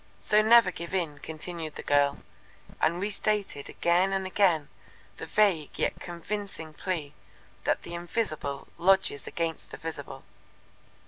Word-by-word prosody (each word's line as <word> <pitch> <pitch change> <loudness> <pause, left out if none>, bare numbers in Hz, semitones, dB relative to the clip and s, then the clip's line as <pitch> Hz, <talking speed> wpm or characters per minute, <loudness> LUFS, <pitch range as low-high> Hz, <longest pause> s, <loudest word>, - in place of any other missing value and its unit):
"So 210 0 +4
never 220 -3 +7
give 170 +2 -5
in," 160 -6 -1
continued 160 +1 -6
the - - -6
girl, 140 0 +2 0.6
and 170 +2 +2
restated 200 -6 -1
again 175 +3 +2
and 190 0 0
again 185 -6 +3 0.5
the - - -6
vague 190 -8 +2
yet - - 0
convincing 175 -2 -5
plea 155 -4 -3 0.5
that - - +1
the 170 - -7
Invisible 170 -6 -2
lodges 190 -5 +3
against 165 -1 -3
the - - -8
Visible. 145 -4 -6
170 Hz, 130 wpm, -28 LUFS, 155-195 Hz, 0.6 s, never